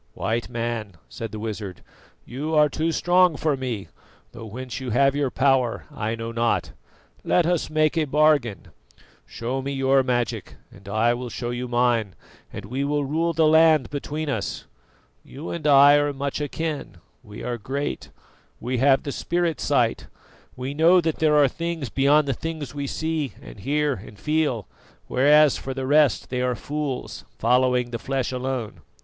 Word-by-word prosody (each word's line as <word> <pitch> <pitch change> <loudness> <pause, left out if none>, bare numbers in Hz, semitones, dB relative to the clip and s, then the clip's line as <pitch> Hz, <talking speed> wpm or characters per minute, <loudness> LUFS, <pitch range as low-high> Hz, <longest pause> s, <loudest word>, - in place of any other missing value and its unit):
"White 115 +1 -2
Man," 115 -4 -4
said 115 -1 -6
the 110 - -6
wizard, 105 -4 -6 0.4
"you 150 +6 -3
are 150 -1 +5
too 160 +3 -1
strong 175 +1 +3
for 150 -1 0
me, 120 -8 -4 0.4
though 115 - -9
whence 125 +4 -6
you 130 -2 -5
have 135 +4 +3
your 145 -2 0
power 130 -3 +1
I 110 +1 -3
know 115 0 -5
not. 115 0 0 0.5
Let 175 - +2
us 175 -1 0
make 155 +1 +2
a 155 - +1
bargain. 145 - +2 0.6
Show 125 +3 -4
me 140 +1 -4
your 135 0 +3
magic 125 -2 -2 0.2
and 100 0 -13
I 110 +3 +2
will 125 0 -5
show 120 0 -4
you 125 +1 -4
mine, 120 -6 +1 0.4
and 100 - -7
we 130 +6 -3
will 145 0 0
rule 165 +4 0
the 165 -1 +2
land 155 -4 +5
between 150 +2 -4
us. 140 - -3 0.6
You 145 +5 -8
and 160 -3 -3
I 145 0 +7
are 145 0 +1
much 140 +1 -3
akin 150 - -4 0.2
we 105 -4 -10
are 120 0 -3
great; 140 +6 -4 0.5
we 125 +1 -2
have 135 +1 +4
the 140 - -4
spirit 170 -1 -1
sight; - - +1 0.5
we 130 +2 -4
know 165 +5 +5
that 160 -2 -1
there 155 -1 +3
are 145 -2 +6
things 165 -2 -4
beyond 140 +4 +3
the 135 - +1
things 155 -2 -6
we 140 -1 -4
see 160 -2 -2
and - - -12
hear 145 +6 0
and 105 -1 -10
feel; 150 - 0 0.4
whereas, 150 +2 +4
for 135 -1 -6
the 135 -1 -3
rest, 145 -1 +3
they 125 -1 -1
are 125 -1 0
fools, 145 +1 -4
following 125 -1 +2
the 115 - -4
flesh 135 -2 -2
alone. 130 -3 -4
135 Hz, 170 wpm, -24 LUFS, 120-150 Hz, 0.6 s, I